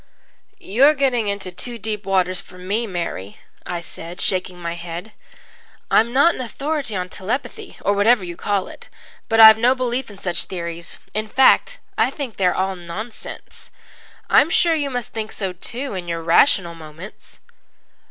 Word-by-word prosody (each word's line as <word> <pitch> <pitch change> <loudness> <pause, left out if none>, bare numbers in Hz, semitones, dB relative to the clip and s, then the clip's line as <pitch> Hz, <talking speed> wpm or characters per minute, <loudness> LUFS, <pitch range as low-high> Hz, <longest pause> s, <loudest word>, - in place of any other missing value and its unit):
"You're 270 +10 +4
getting 255 -6 +1
into 200 -2 -3
too 235 +7 -4
deep 210 -2 -5
waters 185 -1 +1
for 180 - -16
me, 205 +6 -2
Mary," 170 - -5 0.3
I 175 -1 -3
said, 170 +2 -10
shaking 185 -1 0
my 170 -1 -3
head. 170 +4 -7 0.8
"I'm 230 +2 +4
not 285 +7 +5
an - - -5
authority 275 0 -3
on 180 -1 -2
telepathy, 205 +9 -5
or 200 - +2
whatever 205 +1 +4
you 175 -1 -6
call 200 0 -1
it. - - -12 0.4
But 225 0 +2
I've 220 0 +10
no 250 +3 +4
belief 250 0 -2
in 205 - -12
such 180 -3 -2
theories. 170 -2 -6 0.2
In 215 +1 -2
fact, 265 - +4 0.2
I - - +4
think 270 -7 -6
they 190 - +3
are - - +1
all 190 0 0
nonsense. 185 +6 -8 0.6
I'm 295 - +5
sure 340 -1 +3
you 290 -3 -1
must 245 -3 -4
think 220 -1 -4
so 190 -3 -3
too 245 +9 -5
in 180 -2 -5
your 165 -1 -3
rational 170 0 +4
moments." 165 +4 -10
200 Hz, 170 wpm, -21 LUFS, 180-245 Hz, 0.8 s, I've